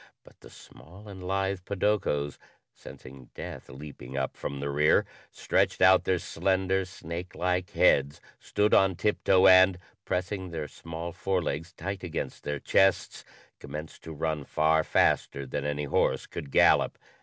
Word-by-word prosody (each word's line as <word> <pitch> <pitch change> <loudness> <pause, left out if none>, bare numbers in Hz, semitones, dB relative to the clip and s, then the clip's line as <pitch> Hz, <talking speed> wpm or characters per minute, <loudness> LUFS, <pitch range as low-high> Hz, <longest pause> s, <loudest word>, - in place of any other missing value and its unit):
But - - -20
the - - -15
small 95 +8 -15
and 95 -2 -10
lithe 95 +1 -1
podokos, 95 -8 -1 0.3
sensing 65 -1 -13
death - - -8
leaping 65 -1 -9
up 65 -1 -2
from 70 - -5
the 70 0 -3
rear, 75 +2 +3 0.2
stretched - - 0
out 95 0 +5
their 95 - +2
slender, 95 +1 0
snake 90 -1 -8
like 90 +2 -1
heads, 70 -6 +3 0.2
stood 105 +1 0
on 95 -1 +4
tiptoe, 95 0 +2
and, 95 0 +7 0.3
pressing 95 0 -3
their 80 -3 -5
small 85 +3 -7
forelegs 85 -3 -2
tight 95 0 -6
against 85 -2 -5
their 75 -1 -3
chests, 95 +5 +1 0.4
commenced 75 +3 -8
to 80 - -9
run 80 -1 -3
far 80 +3 +2
faster 70 -2 +1
than 70 +2 -4
any 75 0 -2
horse 70 - 0
could 70 - -8
gallop. - - +4
85 Hz, 145 wpm, -28 LUFS, 75-95 Hz, 0.4 s, and